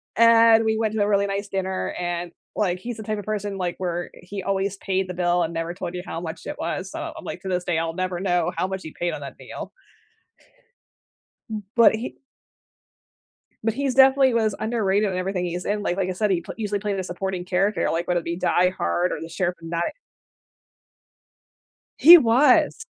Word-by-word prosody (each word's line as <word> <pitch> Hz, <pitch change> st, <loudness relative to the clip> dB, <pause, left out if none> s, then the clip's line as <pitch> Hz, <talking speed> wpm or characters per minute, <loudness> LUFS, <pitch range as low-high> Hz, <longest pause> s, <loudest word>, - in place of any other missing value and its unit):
and 230 Hz, 0 st, +6 dB
we 220 Hz, 0 st, +1 dB
went 220 Hz, -1 st, 0 dB
to 220 Hz, -, 0 dB
a 205 Hz, -, +2 dB
really 200 Hz, -1 st, +2 dB
nice 200 Hz, +1 st, -3 dB
dinner 190 Hz, -1 st, -2 dB
and, 175 Hz, -1 st, -3 dB, 0.2 s
like, 185 Hz, -4 st, 0 dB
he's 235 Hz, +4 st, -6 dB
the 220 Hz, -, -7 dB
type 215 Hz, 0 st, -2 dB
of 205 Hz, -, -7 dB
person, 205 Hz, -1 st, -3 dB
like, 180 Hz, -2 st, -2 dB
where 175 Hz, -1 st, -3 dB
he 195 Hz, +2 st, -8 dB
always 195 Hz, 0 st, -1 dB
paid 190 Hz, -1 st, -1 dB
the -, -, -3 dB
bill 175 Hz, 0 st, +1 dB
and 165 Hz, 0 st, -3 dB
never 165 Hz, +1 st, -2 dB
told 175 Hz, 0 st, -6 dB
you 180 Hz, -, -5 dB
how 165 Hz, -, -5 dB
much 160 Hz, -1 st, -7 dB
it -, -, -5 dB
was, 185 Hz, +3 st, -3 dB
so 325 Hz, -, -5 dB
I'm 320 Hz, -, -10 dB
like, -, -, -6 dB
to 195 Hz, -, -8 dB
this 180 Hz, -1 st, -1 dB
day, 175 Hz, -2 st, 0 dB
I'll 165 Hz, 0 st, -2 dB
never 185 Hz, -1 st, -2 dB
know 180 Hz, -2 st, +1 dB
how -, -, 0 dB
much 190 Hz, 0 st, -4 dB
he 160 Hz, -, -9 dB
paid 175 Hz, 0 st, -1 dB
on -, -, -6 dB
that -, -, -8 dB
meal. -, -, -8 dB, 1.8 s
Mm 215 Hz, -1 st, -4 dB
But 230 Hz, -2 st, +6 dB
he 225 Hz, +3 st, -6 dB, 1.4 s
but 225 Hz, 0 st, +1 dB
he's 270 Hz, 0 st, -1 dB
definitely 265 Hz, -1 st, +6 dB
was 220 Hz, -3 st, +1 dB
underrated 210 Hz, -3 st, +1 dB
in 185 Hz, -, -3 dB
everything 185 Hz, -1 st, -2 dB
he's 175 Hz, +1 st, -4 dB
in, 205 Hz, 0 st, -1 dB
like 180 Hz, -, -1 dB
like, 190 Hz, -1 st, 0 dB
I -, -, -1 dB
said, 205 Hz, +2 st, 0 dB
he 175 Hz, -, +1 dB
pl -, -, -8 dB
usually 210 Hz, -2 st, -2 dB
played 205 Hz, -1 st, -2 dB
a -, -, -2 dB
supporting 185 Hz, 0 st, -4 dB
character, 190 Hz, +3 st, +1 dB
like, 170 Hz, +1 st, -2 dB
whether 175 Hz, -1 st, +1 dB
it -, -, -18 dB
be 170 Hz, 0 st, -3 dB
Die 180 Hz, 0 st, +3 dB
Hard 180 Hz, -1 st, -1 dB
or -, -, -3 dB
The 165 Hz, -, -6 dB
Sheriff 180 Hz, +1 st, -2 dB
of 165 Hz, -, -8 dB
Not 170 Hz, +1 st, -1 dB, 2.2 s
He 345 Hz, +3 st, +11 dB
was. 255 Hz, 0 st, +3 dB
190 Hz, 215 wpm, -23 LUFS, 175-215 Hz, 2.2 s, He